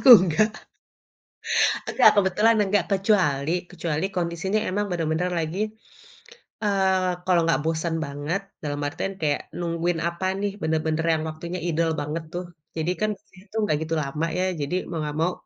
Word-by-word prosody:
Aku - - +3 0.2
enggak. 190 +5 +3 1.4
Enggak, - - +7
kebetulan 205 +4 +4
enggak 205 0 +1
kecuali 185 -8 +2 0.2
kecuali 170 -2 -2
kondisinya 175 +4 0
emang 205 +2 0
bener-bener 165 +1 0
lagi, 160 +4 -3 1.0
eee, 190 -2 +2
kalau 180 -2 +4
nggak 165 -2 +2
bosen 160 +1 0
banget 145 +7 -3 0.2
dalam 145 -1 -2
artian 195 +6 -3
kayak 145 -2 +1 0.2
nungguin 170 0 -1
apa 170 +2 -5 0.2
nih, 205 0 0
benar-benar 160 0 0
yang 155 -1 -1
waktunya 170 +3 -5
idle 165 0 +1
banget 150 +3 -3
tuh, 180 +1 -3 0.3
jadi 160 +2 0
kan 215 - +2 0.3
itu 195 +3 -17
enggak 180 -8 +1
gitu 160 +1 -3
lama 150 +4 -2
ya, 185 - +1 0.2
jadi 145 +5 -1
mau 170 - -3
enggak 150 -1 -3
mau, 175 +2 +2
170 Hz, 150 wpm, -25 LUFS, 155-190 Hz, 1.4 s, Enggak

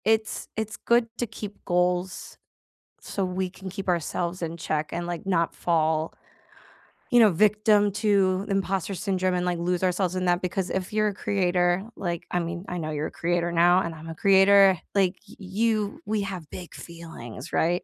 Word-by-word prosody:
It's 220 0 +1
it's 220 -1 -3
good 235 -1 +2
to 240 - -1
keep 210 -1 -8
goals 180 +1 -1 0.6
so 195 -2 -2
we 185 0 -2
can 190 +1 -9
keep 195 0 -5
ourselves 175 +1 -1
in 165 0 -3
check 155 -2 -2
and, 175 0 -3
like, 175 0 -5
not 170 -3 +1
fall, 160 -1 0 1.0
you 245 -3 +5
know, 220 -3 +7
victim 210 +2 +3
to 200 -2 +2
imposter 195 -1 -1
syndrome 185 -1 0
and, 180 0 0
like, 175 -1 0
lose 175 +1 -1
ourselves 185 0 0
in 185 0 -1
that, 175 0 +1
because 180 +1 -2
if 190 +1 -3
you're 215 0 +2
a 205 - -1
creator, 180 -2 +1
like 170 -3 -3
I 180 - 0
mean, 170 +1 -4
I 180 - -3
know 155 -2 -3
you're 150 0 -2
a - - -10
creator 175 0 -1
now, 175 +2 +5
and 170 -2 -4
I'm 160 +1 -10
a 165 - -6
creator, 195 0 +6 0.2
like, 190 -2 +2
y - - -14
you 215 - -1
we 215 -1 0
have 190 -5 -5
big 180 -2 -9
feelings, 160 -8 -9
right? 175 +2 +1
185 Hz, 185 wpm, -26 LUFS, 175-200 Hz, 1.0 s, know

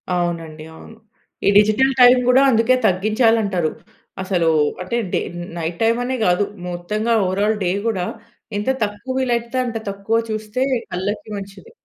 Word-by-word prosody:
అవునండి, 165 -3 -3
అవును. 220 +7 -13 0.5
ఈ - - +7
డిజిటల్ 215 +6 +4
టైమ్ 250 +1 +8
గూడా 255 +2 +5
అందుకే 230 +2 +3
తగ్గించాలి 215 +5 +2
అంటారు. 180 -6 -1 0.5
అసలు 175 -4 +1 0.3
అంటే 185 +6 -2 0.2
డే - - +2 0.4
నైట్ 165 +1 -4
టైమ్ 230 +1 +3
అనే 260 +1 -2
గాదు. 180 +3 +2 0.2
మొత్తంగా 210 +6 -2
ఓవరాల్ 205 +4 0
డే 180 - +1 0.2
కూడా 190 -5 -1 0.5
ఎంత 210 +5 -2
తక్కువ 205 +5 -4
వీలైతే 240 -1 -1
అంత 235 -2 -3
తక్కువ 200 +3 -1
చూస్తే 215 +3 -3 0.3
కళ్ళకి 200 +4 -3
మంచిది. 200 - -10
210 Hz, 140 wpm, -20 LUFS, 180-235 Hz, 0.5 s, టైమ్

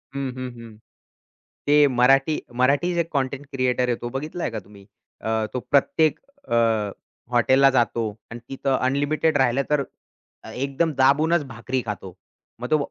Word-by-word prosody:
हं, 135 -1 -2
हं, 130 0 -5
हं. 115 -2 -12 0.9
ते 145 0 +6
मराठी 135 +4 +3 0.2
मराठी 140 +8 +2
जे 170 - +2
कंटेंट 140 0 -2
क्रिएटर 125 -1 0
आहे 120 - +2
तो 120 - -4
बघितलंय 150 +7 -4
का 110 - -4
तुम्ही? 100 0 -17 0.4
अ, 110 0 0
तो 130 - -1
प्रत्येक 150 +2 +3 0.3
अ, - - +1 0.8
हॉटेलला 130 +3 +5
जातो 120 -2 +1 0.3
आणि 120 - -7
तिथं 135 0 -1
अनलिमिटेड 145 +4 +1
राहिलं, 130 0 +2
तर 150 -2 +2 0.7
एकदम 140 +6 -1
दाबूनच 150 +5 +4
भाकरी 125 +2 -3
खातो. 95 -3 -6 0.5
मग 125 - -4
तो 155 - +5
135 Hz, 145 wpm, -23 LUFS, 125-145 Hz, 0.9 s, ते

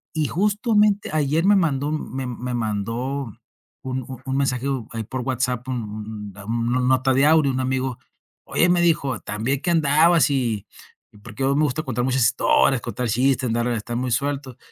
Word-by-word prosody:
Y 155 -1 +1
justamente 210 +1 +1
ayer 155 +2 +1
me 205 +1 +6
mandó 150 -5 +1
me 135 -3 -4
me 125 0 -5
mandó 115 +5 -2 0.6
un 130 0 -3
un 130 -2 -9
un 135 0 -2
mensaje, 130 -2 0 0.3
ahí 115 -1 -4
por 130 +2 -4
WhatsApp 125 -1 -2
un 105 -3 -5
un 115 +3 -2
una 125 +1 +1
nota 130 +1 +2
de 135 +2 +4
audio, 155 -3 +4
un 130 - -2
amigo: 130 -1 -2 0.5
"Oye", 175 - +2
me 175 0 +3
dijo, 140 - +1
"Tan 105 +1 -5
bien 135 +3 0
que - - -2
andabas 160 +1 +4
y" 115 -7 -1 0.6
porque 115 +3 -6
a - - +2
mí - - +2
me 150 - +2
gusta 150 +3 -2
contar 125 -3 -2
muchas 130 -1 +1
historias, 120 +3 +3
contar 125 +1 -3
chistes, 130 +3 +2
andar 120 +1 0
estar 120 0 -3
muy 130 +1 -2
suelto 135 0 -2
130 Hz, 185 wpm, -22 LUFS, 120-145 Hz, 0.6 s, me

